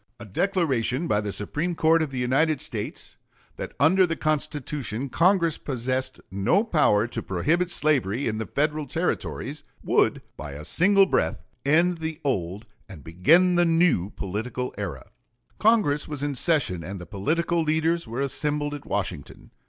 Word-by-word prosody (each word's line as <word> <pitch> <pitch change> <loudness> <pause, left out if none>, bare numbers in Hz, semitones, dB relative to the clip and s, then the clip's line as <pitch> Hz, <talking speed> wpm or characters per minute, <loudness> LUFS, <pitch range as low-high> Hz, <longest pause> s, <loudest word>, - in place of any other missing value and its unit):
A 120 - -9
declaration 140 - 0
by 105 -6 +1
the 105 -1 -4
Supreme 150 - -2
Court 160 +1 +3
of 155 - -1
the 135 - -7
United 135 +5 +1
States 105 -5 -6 0.4
that - - -7
under 180 +6 +5
the 165 - -2
Constitution 145 -5 -2
Congress 170 +2 +3
possessed 130 -1 -2
no 100 - +2
power 150 - +3
to 120 -1 -3
prohibit 160 - 0
slavery 140 - +1
in 110 -1 -2
the 110 - -4
Federal 150 +1 -1
Territories 155 -1 -3 0.2
would - - +2
by 75 -2 -7
a 75 +2 -8
single 195 - +4
breath - - 0 0.2
end 170 +4 +2
the 160 0 -4
old 100 - -2 0.2
and 80 -8 -11
begin 170 - +3
a - - +5
new 165 - +2
political 110 +6 -4
era. 95 -10 -5 0.5
Congress 210 -10 +3
was 145 -2 -4
in 145 0 -1
session 130 - +1
and 95 +1 -6
the 90 - -8
political 165 - -1
leaders 160 0 0
were 120 +4 -4
assembled 145 +1 -2
at 145 - -8
Washington. - - -4
145 Hz, 155 wpm, -25 LUFS, 110-165 Hz, 0.5 s, under